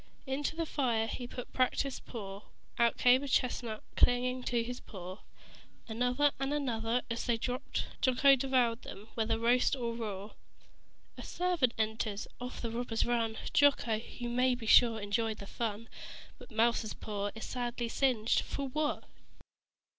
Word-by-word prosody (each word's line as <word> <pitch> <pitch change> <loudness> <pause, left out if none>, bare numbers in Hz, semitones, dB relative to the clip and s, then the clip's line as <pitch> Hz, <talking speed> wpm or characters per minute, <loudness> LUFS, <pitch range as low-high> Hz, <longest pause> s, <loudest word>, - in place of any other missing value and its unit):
Into 280 +3 -2
the 330 0 -1
fire 240 -7 +1
he 240 +2 -5
put 245 0 -7
a - - -28
practiced 260 +1 0
paw: 200 -4 -6 0.4
Out 235 0 +3
came 250 +1 +5
a 280 - -4
chestnut 240 -4 0
clinging 250 +1 +3
to 235 -1 +1
his 245 +1 -5
claw 185 -1 -9 0.7
Another 250 +5 +2
and 270 +1 -1
another. 245 -4 0
As 230 - -2
they 235 -1 +2
dropped 250 +3 -3 0.2
Jocko 270 +1 +6
devoured 250 -3 +1
them, 205 +3 -10
whether 225 0 0
roast 245 +4 +3
or 235 -3 -2
raw. 210 -3 -5 0.9
A - - -4
servant 350 -9 0
enters. 220 -1 -1
Off 250 +1 -6
the 230 - -2
robbers 230 -1 -1
run. 230 -2 0 0.2
Jocko, 285 -5 +4 0.2
you 240 - -4
may 250 +1 +3
be 240 -2 -8
sure, 225 0 +6
enjoyed 215 +2 -1
the 200 - -8
fun. 225 +1 -4 0.5
But - - -13
Mouser's 230 -1 +1
paw 205 -1 -3
is 220 - -6
sadly 240 -1 -3
singed 235 -3 +2
for 280 -1 -4
what? 300 +2 -1
240 Hz, 155 wpm, -32 LUFS, 225-255 Hz, 0.9 s, Jocko